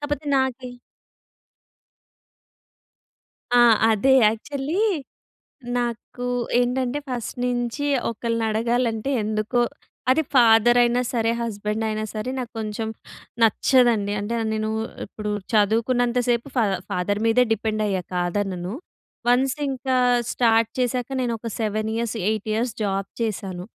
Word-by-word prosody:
కాకపోతే 290 0 -3
నాకి 260 -1 -1 2.9
ఆ! - - +7 0.3
అదే 245 +5 +3 0.2
యాక్చువల్లీ 280 - -2 1.0
నాకు 240 +1 -4 0.3
ఏంటంటే, 250 +2 0
ఫస్ట్ 245 -2 -4
నించి 245 +3 -1 0.2
ఒకళ్ళని 230 0 -2
అడగాలంటే 230 +2 0
ఎందుకో 215 +3 0 0.5
అది 315 +5 +4
ఫాదర్ 240 0 +6
అయినా 240 +1 +2
సరే, 230 -1 +1
హస్బెండ్ 215 -1 -2
అయినా 215 0 -2
సరే, 215 +4 -3
నాకు 245 -2 -5
కొంచెం 220 0 -3 0.5
నచ్చదండి. 225 -2 +3
అంటే 210 +3 -3 0.2
నేను 215 0 -1 0.4
ఇప్పుడు 210 +1 -5 0.2
చదువుకున్నంత 235 +4 +2
సేపు 240 +3 +1
ఫా 235 - +4 0.3
ఫాదర్ 205 +3 -1
మీదే 240 +2 +4
డిపెండ్ 215 0 -2
అయ్యా 190 -3 -1
కాదనను. 180 +1 -2 0.5
వన్స్ 255 +2 +3
ఇంకా 260 -1 -1 0.4
స్టార్ట్ 225 -2 +3
చేసాక 250 0 0
నేను 245 -2 0
ఒక 230 +1 -6
7 215 0 -1
ఇయర్స్, 230 0 -2
8 215 0 -2
ఇయర్స్ 230 +1 0
జాబ్ 195 -1 -1
చేశాను. 190 -4 -3
230 Hz, 115 wpm, -23 LUFS, 215-245 Hz, 2.9 s, ఆ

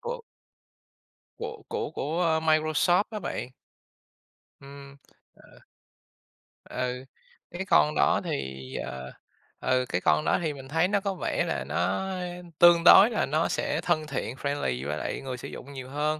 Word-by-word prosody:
Của 485 +1 -5 1.2
Của 455 -1 -6
của 455 -1 -3
của 160 +2 0
Microsoft 155 +3 +3
á 215 -2 -5
bạn. 170 -8 -4 1.1
Ừm, 140 0 -12 0.5
ờ. - - -18 1.1
Ừ, - - -10 0.7
cái 175 - -7
cái 190 - -2
con 150 -4 +4
đó 70 - +3
thì, 65 -1 -5
ờ, 65 -1 -6 0.5
ừ, 130 0 +1
cái 90 - -1
con 75 -2 +2
đó - - +2
thì 155 -3 -1
mình 135 -1 -10
thấy 160 +5 +2
nó 200 +1 +1
có 200 -1 -1
vẻ - - -1
là - - -2
nó 190 - -1 0.5
tương 175 -1 +7
đối 205 +5 +9
là 220 - 0
nó 155 +3 +1
sẽ 150 - -1
thân 155 -3 0
thiện, 130 -4 -4
friendly 130 - -2
với 75 - -2
lại - - -4
người 130 -2 -5
sử - - -8
dụng 140 +2 -9
nhiều 130 -1 -8
hơn. 150 +2 -1
150 Hz, 160 wpm, -27 LUFS, 130-175 Hz, 1.2 s, đối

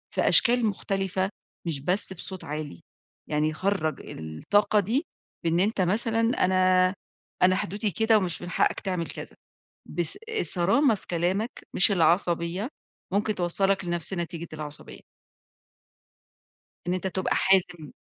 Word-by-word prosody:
في - - +1
أشكال 245 -1 +6
مختلفة، 195 -2 -1 0.4
مش 155 -4 -2
بس 185 +6 +1
في 180 - -10
صوت 190 -2 -8
عالي، 150 - -6 0.5
يعني 155 +1 0
خرّج 185 -2 -1
الطاقة 200 - 0
دي، 230 - 0 0.4
في 165 - +1
إن 170 +2 +1
أنت 205 +1 +1
مثلًا 225 +5 +1 0.2
أنا 185 0 +3 0.5
أنا 185 0 +5
حدودي 205 +3 -2
كده، 220 +5 +3
ومش 180 -5 -2
من 175 - -6
حقك - - +1
تعمل 180 -4 -3
كذا، - - -5 0.5
بص 170 -2 0 0.2
الصرامة 210 - +3
في - - -15
كلامك 185 +7 -1 0.2
مش 195 - +7
العصبية، 175 - +1 0.4
ممكن 210 +1 +1
توصّلك 190 +2 0
لنفس 175 +1 -2
نتيجة 170 -2 -4
العصبية. 150 -1 -8 1.9
إن 180 - 0
أنت 185 - -3
تبقى 190 0 -1
حازم. 175 -6 +1
185 Hz, 135 wpm, -26 LUFS, 170-200 Hz, 1.9 s, مش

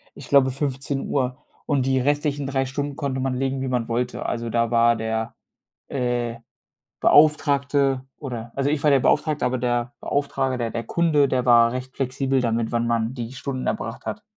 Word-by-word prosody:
ich - - -11
glaube 135 -2 +5
15:00 135 -1 -2 0.3
und 140 -4 +1
die 130 0 +2
restlichen 145 +1 0
3 135 -1 0
Stunden 140 +2 -4
konnte 135 -2 -2
man 130 -1 -1
legen, 135 +1 -1
wie 135 - -2
man 125 -2 -1
wollte. 120 +1 -2
Also, 115 0 -2
da 115 0 0
war 115 0 +4
der, 110 0 -3 0.5
äh, 120 -3 -1 0.6
Beauftragte 140 -3 +3
oder 120 -4 -6
also 140 +1 +1
ich 150 -2 0
war 150 - +5
der 140 -2 +5
Beauftragte, 150 +2 +1
aber 125 0 0
der 120 0 -1
Beauftrager, 135 -2 -1
der 115 -2 -2
der 115 - -3
Kunde, 150 +1 +2
der 125 -2 0
war 115 -1 +6
recht 130 +1 -6
flexibel 135 0 0
damit, 115 -1 0
wann 120 0 0
man 115 0 0
die 120 -1 -6
Stunden 135 -1 -4
erbracht 115 +1 -4
hat. 205 - -5
130 Hz, 180 wpm, -23 LUFS, 120-140 Hz, 0.6 s, war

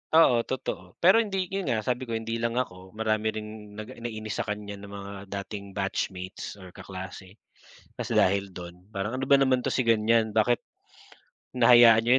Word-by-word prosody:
Oo, 130 -7 +7
totoo. 95 -8 -4
Pero 190 +6 +7
hindi 195 -5 -1
yun 195 -1 -2
nga, 110 -2 0
sabi 125 +2 -2
ko, 115 - -2
hindi 115 +1 -3
lang 115 0 -1
ako. 95 -6 -4
Marami 110 0 0
ring 110 -1 -3 0.3
naga 110 0 -7
nainis 110 -2 -5
sa - - -2
kanya 105 -1 -5
na 100 - -10
mga 100 0 -8 0.2
dating 100 0 -6
batchmates 95 -2 -3
or 95 -3 -12
kaklase, 95 +1 -9 0.6
kasi - - -2
dahil 100 +1 +3
do'n. 90 +1 -10
Parang 105 +6 -2
ano 135 - -2
ba 140 - +7
naman 130 -2 +4
'to 125 - -3
si 130 - +1
ganyan, 115 -1 +3
bakit 110 +3 +2 0.9
hinahayaan 120 -2 +8
niyo 120 - +2
110 Hz, 175 wpm, -27 LUFS, 100-120 Hz, 0.9 s, hinahayaan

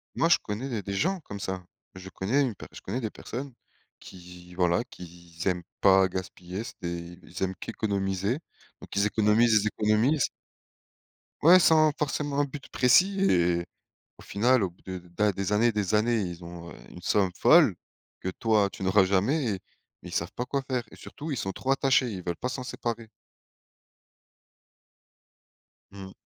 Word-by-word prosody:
Moi, 165 - +2
je 170 - +6
connais, 105 +4 -4
il 135 - -5
y - - 0
a - - -3
des 100 +1 -5
gens 185 - 0
comme 105 -8 -8
ça. 95 -2 -4 0.3
Je 95 0 -10
connais 105 +10 0
une 125 -6 0
pe - - -10
je - - -11
connais 110 +7 -3
des 110 -3 -3
personnes 130 +3 -7 0.5
qui, 90 -1 -13
voilà, 90 +4 +2
qui 90 - -11 0.3
z 85 - -2
aiment 90 -2 +1 0.2
pas 95 -1 +6
gaspiller. 95 +1 -6
C'est - - -9
des 85 0 -6
ils 90 +2 -6
aiment 95 0 -1
qu'économiser. 100 - -2 0.4
Donc - - -10
ils 100 +1 +3
économisent, 110 +2 +3
ils - - 0
économisent 110 +7 +2 1.1
ouais, 175 +4 +8
sans 155 -3 +5
forcément 145 -1 -1
un - - +3
but 140 0 -7
précis 185 +11 +4
et 85 -1 +2 0.5
au - - -15
final, 120 +3 +2
au 95 - 0
bout 85 - -25
de 95 -1 -6 0.2
da 105 -1 +3
des 100 +1 -3
années, 115 +3 +3
des 105 0 0
années, 115 +1 +2
ils 90 -2 -5
ont 85 0 -9 0.2
une 90 - -12
somme 95 0 +2
folle - - +6 0.5
que, 95 - -2
toi, 105 +1 +2
tu - - -8
n'auras 95 +1 +4
jamais 100 +11 +1
et - - -9 0.4
mais - - -8
ils - - -9
savent - - -1
pas 125 - -3
quoi 140 +2 -1
faire 125 -2 -1
et - - -12
surtout, 155 +2 -9
ils 145 - -1
sont 95 - -2
trop 130 - -6
attachés, 135 -2 +3
ils 95 -5 -6
veulent 85 -1 -2
pas - - -3
s'en 130 0 -5
séparer. 115 -2 -5 2.8
Mmh. 95 -1 -9
105 Hz, 185 wpm, -27 LUFS, 95-125 Hz, 2.8 s, ouais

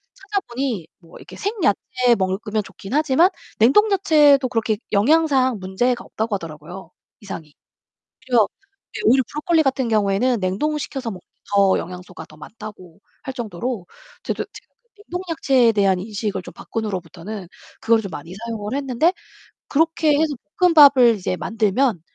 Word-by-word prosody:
찾아보니 270 - -3
뭐 165 -2 -16
이렇게 - - -12
생야채 280 - +1
먹으면 200 +3 -1
좋긴 195 +2 -10
하지만 305 +4 +4 0.3
냉동 410 - +5
야채도 300 -8 +5
그렇게 225 -2 0
영양상 260 +1 +3
문제가 240 +7 -1
없다고 220 -1 -2
하더라고요, 165 +1 -9 0.3
이상이. 160 -7 -9 0.7
그래서 240 -5 +3 0.5
이 - - -4
오히려 265 -5 +5
브로콜리 315 +2 +1
같은 265 -3 0
경우에는 215 +3 +2
냉동을 200 +12 -1
시켜서 265 -5 -4
먹는 185 - -8 0.4
더 195 -1 +4
영양소가 180 -1 -9
더 155 - -17
많다고 190 0 -11 0.2
할 265 - -5
정도로 230 -3 -4 0.4
저도 - - -3
지금 - - -15 0.2
이제 415 -1 -19
냉동 360 -2 -5
야채에 260 -6 +3
대한 195 -3 +2
인식을 205 -1 -4
좀 - - -11
바꾼 225 -1 -5
후로부터는 185 +1 -6 0.3
그거를 225 0 +3
좀 195 - -6
많이 165 +3 -8
사용을 220 +1 -5
했는데 280 +4 +1 0.6
그렇게 315 0 +2
해서 310 -1 +1 0.3
볶음밥을 285 -9 +7
이제 185 -2 -3
만들면 220 0 0
230 Hz, 360 characters per minute, -21 LUFS, 195-275 Hz, 0.7 s, 볶음밥을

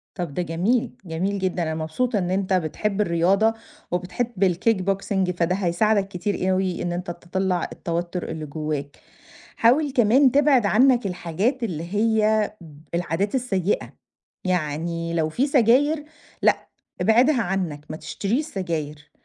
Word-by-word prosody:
طب 175 -6 -4
ده 180 - -1
جميل، 180 +9 0
جميل 185 +4 -2
جدًا. 185 -2 -1
أنا 160 -1 -2
مبسوطة 205 +9 -1
إن 180 -1 -2
أنت 190 0 0
بتحب 190 +4 0
الرياضة، 195 +4 +3 0.4
وبتحب 185 +4 -1
الkickboxing 195 -1 0
فده 175 0 0
هيساعدك 195 +2 +1
كتير 190 0 -1
أوي 185 -1 0
إن 175 - -2
أنت 175 0 -4
تطلّع 180 +1 -2
التوتر 170 +1 -3
اللي 160 -1 -5
جواك. 150 -1 -4 0.6
حاول 275 +6 +3
كمان 255 +2 +4
تبعد 275 -4 +4
عنك 245 +3 +4
الحاجات 190 - -1
اللي 170 -8 -3
هي 215 -1 +2
ب 155 -4 -13 0.2
العادات 175 - -1
السيئة، 205 -7 -1 0.5
يعني 165 -1 -1
لو 160 -2 +1
في 255 - 0
سجاير، 280 +4 +3 0.4
لأ، - - +2 0.3
ابعدها 245 +4 +4
عنك، 175 -7 -2
ما 155 - -5
تشتريش 230 - -2
سجاير، 155 - -5
190 Hz, 135 wpm, -23 LUFS, 170-220 Hz, 0.6 s, كمان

